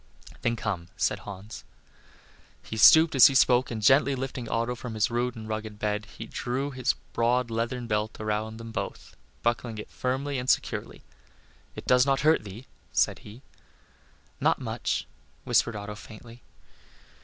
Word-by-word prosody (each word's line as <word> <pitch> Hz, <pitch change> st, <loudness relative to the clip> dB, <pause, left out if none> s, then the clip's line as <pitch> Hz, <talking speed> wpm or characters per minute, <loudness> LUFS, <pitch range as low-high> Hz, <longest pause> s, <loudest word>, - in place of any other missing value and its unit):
"Then 115 Hz, -, +1 dB
come," 100 Hz, -7 st, -3 dB
said 105 Hz, -, 0 dB
Hans. 100 Hz, +2 st, -9 dB, 1.0 s
He -, -, -7 dB
stooped 160 Hz, +8 st, +7 dB
as 130 Hz, -3 st, +9 dB
he 135 Hz, -, -1 dB
spoke, 125 Hz, 0 st, +4 dB
and 110 Hz, -2 st, -5 dB
gently 135 Hz, +3 st, +5 dB
lifting 130 Hz, -2 st, -5 dB
Otto 115 Hz, +1 st, 0 dB
from 120 Hz, -1 st, -7 dB
his 110 Hz, +2 st, +1 dB
rude 120 Hz, +1 st, -1 dB
and 110 Hz, -1 st, -8 dB
rugged 110 Hz, -1 st, -5 dB
bed 105 Hz, 0 st, -2 dB
he 115 Hz, -, -6 dB
drew 130 Hz, +5 st, -3 dB
his 130 Hz, -2 st, 0 dB, 0.2 s
broad 120 Hz, +1 st, +1 dB
leathern 120 Hz, +2 st, -2 dB
belt 105 Hz, -1 st, -2 dB
around 110 Hz, +1 st, -2 dB
them 115 Hz, 0 st, -8 dB
both, -, -, -6 dB, 0.3 s
buckling 120 Hz, -1 st, -1 dB
it 105 Hz, -, -8 dB
firmly 135 Hz, +2 st, -2 dB
and 125 Hz, +1 st, -3 dB
securely. -, -, -1 dB, 0.7 s
"It -, -, -8 dB
does 125 Hz, 0 st, +5 dB
not 135 Hz, 0 st, +1 dB
hurt 155 Hz, -2 st, +4 dB
thee?" 105 Hz, +5 st, -10 dB, 0.3 s
said -, -, +1 dB
he. 110 Hz, +6 st, -13 dB, 1.0 s
"Not -, -, +3 dB
much," -, -, -2 dB, 0.4 s
whispered 120 Hz, -2 st, +2 dB
Otto 105 Hz, 0 st, -6 dB
faintly. 115 Hz, +3 st, -12 dB
115 Hz, 155 wpm, -27 LUFS, 110-125 Hz, 1.0 s, as